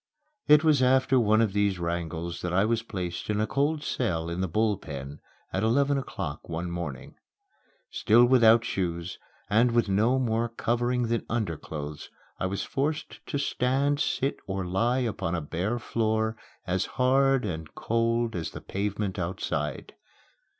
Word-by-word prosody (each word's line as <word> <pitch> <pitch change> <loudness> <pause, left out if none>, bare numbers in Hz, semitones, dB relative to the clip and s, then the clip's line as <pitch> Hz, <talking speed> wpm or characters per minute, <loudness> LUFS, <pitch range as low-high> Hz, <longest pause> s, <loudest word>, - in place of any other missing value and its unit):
It 150 0 +7
was 155 -4 +4
after 130 0 +4
one 110 -1 +4
of 110 -4 +1
these 100 -2 +1
wrangles 85 0 -3
that 90 - -2
I 95 +3 +3
was 115 0 +1
placed 90 -6 -5
in 105 0 +1
a 110 - +2
cold 145 +5 0
cell 85 - -1
in 85 +2 -2
the 95 - 0
Bull 105 +4 +1
Pen 70 0 -7 0.3
at 95 - 0
eleven 140 +6 +2
o'clock 85 - -5
one 85 +1 -3
morning. 85 -7 -6 0.7
Still 120 +3 +5
without 115 -2 +5
shoes 85 -4 -3 0.3
and 115 +3 +3
with 120 -3 +2
no 110 +7 +3
more 115 -2 0
covering 120 +2 0
than 115 0 0
underclothes, 80 -9 -4 0.3
I 95 - 0
was 100 +1 -3
forced 150 +3 -3
to - - -2
stand, 140 +1 +1
sit, 140 -1 0
or 95 -1 -2
lie 115 +8 +1
upon 100 -7 -2
a - - -1
bare 90 +10 -2
floor 110 -1 0 0.3
as 95 0 0
hard 135 0 +3
and 80 -5 -5
cold 115 0 0
as 80 -3 -3
the - - -9
pavement 100 0 -3
outside. 75 -5 -3
110 Hz, 155 wpm, -27 LUFS, 90-120 Hz, 0.7 s, It